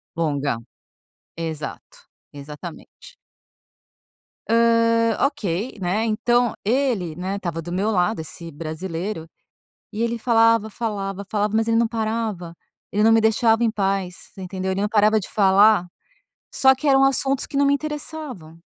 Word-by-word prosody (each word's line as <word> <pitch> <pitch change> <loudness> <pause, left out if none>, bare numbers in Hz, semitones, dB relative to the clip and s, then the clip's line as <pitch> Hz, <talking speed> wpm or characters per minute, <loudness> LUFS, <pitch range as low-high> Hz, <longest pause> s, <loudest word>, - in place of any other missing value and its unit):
Longa. 145 -6 -1 0.8
Exato. 160 -2 -7 0.2
Exatamente. 150 - -11 1.3
Hã, 230 0 +3
ok, 220 - -4
né, 190 +5 0
então, 240 +2 +1
ele, 225 - 0
né, 185 +3 -3
estava 170 -4 -4
do 175 - -8
meu 200 +5 0
lado, 185 +2 +1
esse 165 +1 -9
brasileiro 165 +3 -5 0.7
e 215 - -3
ele 235 0 -1
falava, 230 -1 +3
falava, 200 -3 -4
falava, 210 0 0
mas 225 0 +1
ele 225 - +2
não 230 0 +3
parava. 220 -6 -3 0.4
Ele 210 - +1
não 225 +1 +5
me 225 - +5
deixava 225 +1 +3
em 230 - +2
paz, 195 -3 -2
entendeu? 190 0 -4
Ele 195 - -2
não 210 - 0
parava 215 0 +3
de 185 - -8
falar, 200 -1 +4 0.7
só 265 0 +5
que 275 +3 -4
eram 270 -1 +5
assuntos 270 0 +2
que - - -10
não 285 - +4
me 280 - +4
interessavam. 290 - -5
210 Hz, 140 wpm, -22 LUFS, 180-230 Hz, 1.3 s, não